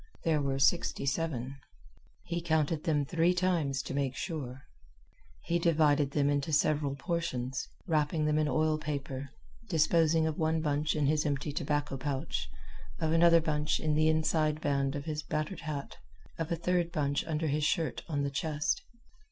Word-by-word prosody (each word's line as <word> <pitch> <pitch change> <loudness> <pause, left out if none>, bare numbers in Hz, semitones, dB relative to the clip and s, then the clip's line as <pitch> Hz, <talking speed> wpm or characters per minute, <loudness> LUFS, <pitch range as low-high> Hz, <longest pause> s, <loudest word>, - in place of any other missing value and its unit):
There 155 -3 +2
were 135 -1 -1
sixty 140 +2 +2
seven. 135 -2 -2 0.7
He 170 0 -3
counted 160 -1 0
them 150 -4 +2
three 170 +4 +2
times 165 -7 +1
to - - -5
make 135 -2 -1
sure. 140 -7 -5 0.8
He 170 0 0
divided 150 -4 +3
them 140 0 +1
into 145 +2 0
several 150 -2 +2
portions, 135 -5 -3 0.2
wrapping 155 -2 +1
them 150 0 +2
in 155 - +2
oil 155 0 +1
paper, 140 -2 -4 0.4
disposing 160 -1 +3
of 160 0 -2
one 160 0 +1
bunch 150 0 0
in 150 -2 +1
his 150 +2 +2
empty 145 0 -1
tobacco 145 -1 -1
pouch, 130 - -3 0.5
of 160 -1 0
another 165 0 +6
bunch 150 -1 0
in 155 -1 0
the 155 +1 +3
inside 155 -1 +1
band 140 -1 0
of 140 0 -5
his 155 -1 -3
battered 155 +4 -3
hat, 150 -3 -5 0.4
of 165 0 -3
a - - +2
third 175 0 0
bunch 145 -4 0
under 160 0 -1
his 150 0 0
shirt 160 +1 0
on 145 -3 0
the 140 - -1
chest. 155 - -1
150 Hz, 165 wpm, -31 LUFS, 140-160 Hz, 0.8 s, another